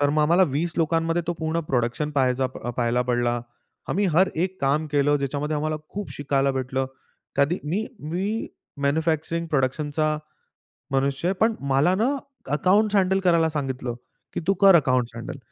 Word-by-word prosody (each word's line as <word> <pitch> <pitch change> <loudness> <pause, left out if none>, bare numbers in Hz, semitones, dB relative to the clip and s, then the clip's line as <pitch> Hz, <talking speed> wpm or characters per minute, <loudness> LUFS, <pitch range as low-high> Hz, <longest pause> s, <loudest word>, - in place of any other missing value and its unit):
तर 145 0 +3
मग 155 +1 +2
आम्हाला 170 +5 +4
20 160 +5 -1
लोकांमध्ये 165 +1 +1
तो 175 - 0
पूर्ण 160 +1 -1
प्रोडक्शन 125 +4 0
पहायचा 130 -2 +1
पाहायला 120 -1 -1
पडला. 120 0 +1 0.5
आम्ही 200 +3 +1
हर 185 +2 +5
एक 185 +3 -2
काम 140 +3 +1
केलं 145 0 +3
ज्याच्यामध्ये 145 +2 -2
आम्हाला 155 +1 -1
खूप 205 +1 -5
शिकायला 140 -1 +1
भेटलं. 130 0 -1 0.5
कधी 145 +6 +2
मी 185 +9 -1 0.3
मी 200 +6 -2 0.4
मॅन्युफॅक्चरिंग 160 +3 0
प्रोडक्शनचा 150 +2 0 0.8
मनुष्य 135 +4 0
आहे. - - +1
पण 225 +1 +3 0.2
मला 140 +7 +3
ना, 220 +4 +1 0.5
अकाउंटस 200 +7 +3
हँडल 190 0 +3
करायला 165 -2 +4
सांगितलं 130 -5 -3 0.4
की - - -2
तू 195 - +5
कर 195 -2 +8
अकाउंट्स 130 -6 +2
हँडल. 115 +3 -6
150 Hz, 155 wpm, -24 LUFS, 135-170 Hz, 0.8 s, कर